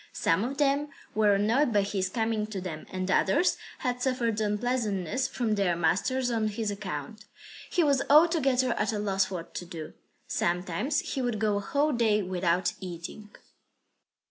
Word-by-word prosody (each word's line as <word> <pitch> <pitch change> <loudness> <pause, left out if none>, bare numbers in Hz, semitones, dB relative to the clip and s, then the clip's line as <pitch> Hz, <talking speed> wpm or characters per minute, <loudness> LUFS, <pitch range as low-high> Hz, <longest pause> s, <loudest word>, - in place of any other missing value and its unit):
Some 165 +5 +1
of 270 +4 -3
them 285 0 +2 0.3
were 210 -2 +4
annoyed 235 +7 +2
by 205 -2 +3
his 195 -2 -1
coming 220 0 -1
to 210 -3 -5
them; 170 -4 -6
and 185 0 -2
others 200 - +3 0.2
had 250 -2 -2
suffered 240 -4 0
unpleasantness 210 0 0
from 230 -4 -1
their 195 -4 +1
masters 200 +10 +1
on 220 -2 +1
his 215 0 -2
account. 200 +1 -6 0.4
He 350 - +2
was 280 -3 +3
altogether 280 -5 +4
at - - -1
a - - -1
loss 195 -2 0
what 175 -3 -6
to - - -4
do. 160 -3 -7 0.3
Sometimes 180 - 0
he 270 - -3
would 245 -3 -1
go 210 -1 +1
a - - -2
whole 290 +8 +1
day 220 -3 +2
without 180 -1 0
eating. 185 +3 -8
210 Hz, 165 wpm, -28 LUFS, 190-250 Hz, 0.4 s, were